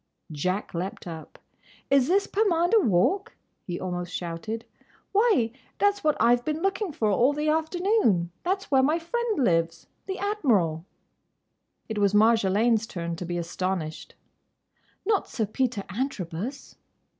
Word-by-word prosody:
Jack 185 +7 -2
leaped 180 +3 -4
up. 165 -2 -9 0.5
"Is 275 -2 +5
this 395 +4 +3
Pomander 395 0 +3
Walk?" 340 - +2 0.3
he 175 -2 -3
almost 180 -1 -4
shouted. 180 +7 -5 0.5
"Why, 400 - +3 0.3
that 405 0 +3
's 405 - -14
what 305 -1 +2
I 240 +1 +6
Ve 245 - -6
been 310 +5 -3
looking 390 -1 0
for 220 -7 0
all 245 +8 +3
the 300 +1 -1
afternoon. 320 - +1
That's 385 0 -2
where 265 -1 +5
my 300 +5 +2
friend 445 +6 -2
lives—the 165 - -2
Admiral!" 220 - +1 1.0
It 220 -2 -3
was 200 0 +3
Marjolaine's 220 +1 +3
turn 170 -3 -4
to 180 - -5
be 175 0 -3
astonished. 170 -1 -4 0.9
"Not 415 -1 +1
Sir 220 - -1
Peter 220 0 -1
Antrobus!" 220 - -4
230 Hz, 135 wpm, -26 LUFS, -, 1.0 s, I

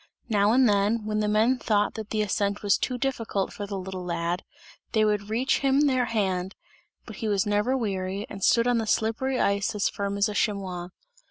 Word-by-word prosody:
Now 205 -1 +3
and 255 +1 +5
then, 210 +2 +2
when 215 0 -1
the 210 - 0
men 220 +5 +2
thought 210 -3 +1
that 220 -2 -7
the 215 -1 0
ascent 200 0 -1
was 200 -2 +4
too 250 - -1
difficult 230 -7 -2
for 205 - -6
the 200 -1 -4
little 185 -1 -6
lad, 170 0 -2 0.5
they 215 -2 +3
would 210 -1 0
reach 245 +5 +1
him 275 0 +3
their 260 -4 +2
hand, 190 -4 -1 0.5
but - - -10
he 225 - -3
was 200 -2 +1
never 210 +5 +1
weary 195 -3 -2
and 195 -2 -8
stood 235 -1 +4
on 245 -1 +2
the 220 - -3
slippery 235 +5 0
ice 200 +2 +1
as 205 - +1
firm 200 0 -3
as 200 +2 +3
a 210 - -4
chamois. 190 -4 -2
210 Hz, 205 wpm, -26 LUFS, 200-230 Hz, 0.5 s, and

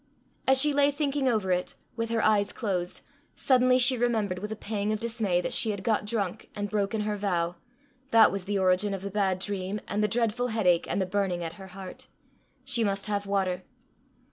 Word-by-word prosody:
As 265 0 +6
she 295 +1 +4
lay 285 0 +4
thinking 285 -1 -1
over 210 -6 0
it, 180 0 -1 0.2
with 230 -1 -2
her 230 -1 0
eyes 205 -2 +3
closed, 180 -6 -3 0.3
suddenly 255 -1 +4
she 255 +1 +5
remembered, 220 -6 0
with 210 +3 -6
a - - -2
pang 210 0 -3
of 215 - -1
dismay, 220 -6 0
that - - -3
she 225 - +3
had 200 -2 -3
got 215 0 +1
drunk 210 -2 -3
and 205 -1 -4
broken 210 +1 0
her 210 0 -1
vow 175 -4 -1 0.5
that 225 -4 +6
was 195 -2 -4
the 205 0 -1
origin 190 +2 +2
of 190 - -8
the 200 - -4
bad 190 -2 +1
dream, 195 +1 -3
and 210 +1 -1
the - - +3
dreadful 230 +2 0
headache, 190 -7 +2
and - - 0
the 190 - +1
burning 185 -2 -1
at 165 -1 -5
her 190 - -9
heart! 190 -1 -9 0.6
She 260 -3 0
must 200 -1 -1
have 205 -1 -2
water! 190 -2 0
205 Hz, 205 wpm, -27 LUFS, 190-230 Hz, 0.6 s, As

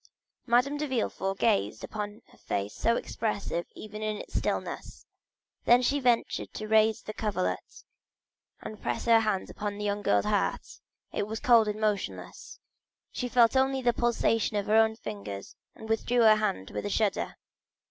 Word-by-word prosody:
Madame 250 +5 +3
de 300 +1 -2
Villefort 195 -6 -2
gazed 100 - +1
upon 210 +1 -6
the - - -20
face 100 +1 -3
so 230 - +1
expressive 200 -8 -3
even 215 0 -8
in 215 -1 -2
its - - -10
stillness; - - -3 0.6
then 240 +1 +6
she 285 +3 +2
ventured 245 -3 +1
to 215 - -5
raise 220 0 +3
the 215 - -6
coverlet 205 -4 -3 0.8
and 215 - -8
press - - -2
her 230 -1 +6
hand 215 -4 -1
upon 205 -1 -4
the 210 - -4
young 205 0 -1
girl's 100 - +2
heart. - - -1 0.3
It 200 - -1
was 220 +1 -4
cold 230 -3 +5
and 210 0 -2
motionless. 215 - -3 0.5
She 250 - -3
only 235 -2 +6
felt - - -14
the 265 -2 +2
pulsation 225 -2 +1
in 200 - -1
her 215 - +2
own 220 0 +4
fingers, 100 - -7 0.2
and 220 - -10
withdrew 230 +2 +1
her 215 -1 +7
hand 200 - -2
with - - -3
a - - -3
shudder. 210 -1 0
215 Hz, 170 wpm, -28 LUFS, 205-235 Hz, 0.8 s, her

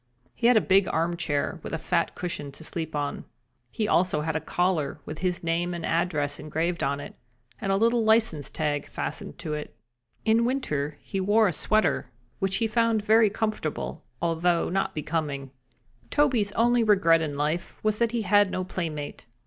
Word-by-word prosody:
He 235 - +1
had 245 -2 +6
a - - +5
big 190 0 +4
armchair 165 -2 -1
with - - -7
a - - 0
fat 170 +1 0
cushion 160 -5 -4
to 160 - -12
sleep 160 -1 -4
on. 145 -1 -2 0.5
He 215 - -2
also 180 -6 +2
had 160 +1 -2
a - - +2
collar 160 -4 0
with 155 - -7
his 180 -1 -1
name 170 +1 0
and 170 - -4
address 155 -4 0
engraved 165 +3 -2
on 140 +1 0
it, 145 - -8 0.5
and 195 - -1
a - - +3
little 230 +2 +3
license 220 -10 +3
tag 150 -2 -2
fastened - - -5
to 155 - -4
it. 150 0 -6 0.5
In 225 +1 +4
winter 150 - -1
he 195 - -3
wore 205 +3 +4
a 180 - 0
sweater, 175 -9 +1 0.3
which 195 0 0
he 225 - +1
found 225 -1 +1
very 220 0 +5
comfortable, 210 -7 -3 0.2
although 170 +1 +1
not 195 +2 0
so - - -28
becoming. 145 -3 -3 0.6
Toby's 250 -9 +2
only 240 +1 +3
regret 190 -6 +4
in 150 -3 -3
life 150 +4 -2
was 215 0 +1
that 235 -1 +2
he 235 -2 -1
had 205 0 +4
no 185 - -2
playmate. 155 -8 -5
175 Hz, 180 wpm, -26 LUFS, 155-215 Hz, 0.6 s, had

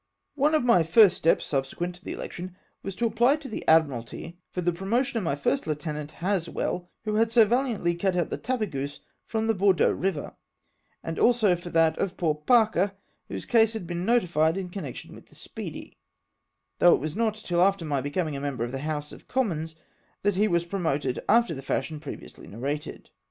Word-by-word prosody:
One 295 +2 +2
of 305 - +2
my 235 -8 +5
first 180 +4 +6
steps, 165 - +2
subsequent 145 +6 -2
to 180 +2 -17
the - - -5
election, 180 +1 -7 0.3
was 195 -1 -6
to 235 - -1
apply 235 +5 +3
to 300 -2 -9
the 220 - -5
Admu 150 -7 +4
altyfor 175 +8 -8
the 175 - +2
promotion 230 +8 0
of - - -4
my 140 -5 0
first 140 +1 -1
lieutenant, 150 -1 -4
Haswell, 180 -1 -2 0.2
Avho 215 0 0
had 225 0 +2
so 230 -2 +6
gallantly 235 -7 +1
cut 180 +2 0
out 175 -3 0
the - - -2
Tapcvjeuse 155 - -3 0.3
from 220 -1 -1
the 225 - +2
Bordeaux 195 -2 +3
river; 185 -5 -2 0.7
and 165 - -4
also 230 -6 +4
for 175 0 -8
that 165 -1 +2
of 190 -1 -2
poor 160 -4 +1
Parker, 200 +3 +3 0.3
whose - - -6
case 225 -2 +4
has 220 -4 -4
been 175 +1 -4
notified 175 -7 +2
in 185 -2 -5
con 195 -3 -5
nection 130 - -8
with - - -14
the - - -21
Speedy^ - - -8 0.8
though 175 - +7
it - - -3
was 155 +3 -4
not 220 -1 +1
till 175 -5 -1
after 195 -2 +3
my 145 -3 0
becoming 150 +2 -2
a 140 - -4
member 140 -4 -2
of 120 - -3
the 135 - -4
House 150 0 -3
of - - -13
Commons 165 -11 -1 0.5
that 205 0 +3
he 205 +3 +2
was 170 -3 +1
promoted 155 -8 -1
after 230 -4 +4
the 135 - -6
fashion 150 +3 -2
previously - - -9
narrated. 140 +7 -5
175 Hz, 200 wpm, -26 LUFS, 155-215 Hz, 0.8 s, though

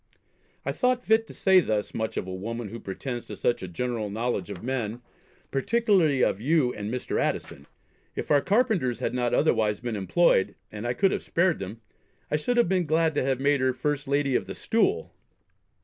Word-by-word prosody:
I - - 0
thought 250 0 0
fit 220 0 +3
to - - -11
say 190 -1 +5
thus 110 - -1
much 110 -1 -3
of - - -1
a 95 - -6
woman 115 +4 -5
who 115 - -7
pretends 120 +5 -5
to - - -6
such 120 - 0
a 95 - -5
general 110 +4 -3
knowledge 115 +4 -2
of - - -7
men, 120 -2 -3 0.5
particularly 180 - +2
of 100 - +1
you 140 -1 +2
and 105 +1 -5
Mr. 125 0 -2
Addison. - - -3 0.5
If - - -4
our 145 -1 +5
carpenters 200 - +1
had - - -2
not 120 -1 +1
otherwise 105 -2 +2
been 120 -2 -3
employed, 100 - +2 0.2
and 105 +2 -5
I 120 - -1
could 195 -1 +3
have - - -1
spared 175 0 +1
them, 100 +4 -7 0.5
I - - +3
should 240 +12 0
have 240 - +4
been 180 -2 +1
glad 160 +1 +2
to - - +1
have 130 -1 0
made 140 0 +2
her 130 0 +2
first 140 +2 -2
Lady 140 -1 +1
of - - 0
the - - -6
Stool. 390 - 0
130 Hz, 200 wpm, -26 LUFS, 115-170 Hz, 0.5 s, say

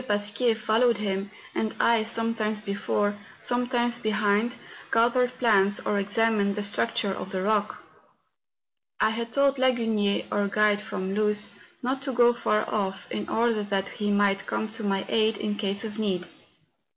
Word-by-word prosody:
Pasquier 205 +3 +1
followed 225 +2 +2
him, 200 -1 -2 0.2
and 220 - -2
I, 230 -1 +4
sometimes 225 -2 -1
before, 205 0 -1 0.2
sometimes 245 -1 0
behind, 215 +2 +1 0.4
gathered 245 +2 +2
plants 205 -4 +3
or 205 - -1
examined 205 0 +1
the 210 - -2
structure 205 0 0
of 190 - -5
the 185 -2 -2
rock. 210 0 0 1.2
I 220 - +3
had 230 +1 -4
told 275 +1 +2
Lagunier, 225 -6 +1
our 205 0 +1
guide 210 0 +2
from 190 -2 -4
Luz, 210 0 0 0.3
not 265 +2 -1
to 275 -1 -3
go 240 0 +5
far 215 -2 0
off, 195 -2 -3
in 105 -1 -4
order 230 -1 +1
that 200 -1 -1
he 205 -1 -3
might 200 -1 +2
come 220 - -2
to 225 0 -6
my 195 -1 0
aid 220 -1 +2
in 210 0 -2
case 200 -1 -1
of 215 0 -6
need. 185 -4 -1
215 Hz, 155 wpm, -26 LUFS, 200-230 Hz, 1.2 s, go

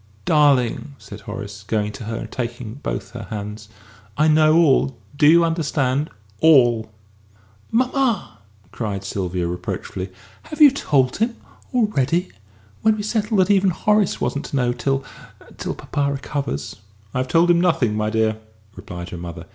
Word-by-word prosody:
"Darling!" 140 -2 +2
said 105 -1 -11
Horace, 100 0 -7
going 105 0 -1
to 110 - -9
her 115 +1 -4
and - - -6
taking 120 -2 -5
both 100 -7 -5
her 115 -5 -8
hands, 105 0 -6 0.5
"I 155 - +4
know 155 0 +5
all 135 -5 +3 0.2
do 145 0 +4
you 170 +2 +7
understand? 150 -4 0 0.3
all!" 120 -8 +5 0.8
"Mamma!" 245 - 0 0.3
cried 100 -4 -4
Sylvia, 90 -2 -2
reproachfully, 90 +2 -4 0.3
"have 305 - -10
you 295 -3 +9
told 135 - +1
him 230 +2 0 0.4
already? 180 - +1 0.5
When 220 0 +3
we 210 - -4
settled 210 -1 +1
that 185 +2 +2
even 195 -1 +4
Horace 210 +3 +1
wasn't 140 +5 -2
to 145 - -5
know 125 -2 +1
till 135 +1 -1 0.5
till - - -3
papa 140 -1 -2
recovers!" 140 - -4 0.4
"I - - -1
have 130 - -1
told 170 +3 +4
him 170 0 +3
nothing, 135 -11 +2
my 105 0 0
dear," 110 0 0 0.4
replied 90 -2 -8
her 90 - -6
mother. 85 -1 -8
135 Hz, 155 wpm, -21 LUFS, 105-170 Hz, 0.8 s, you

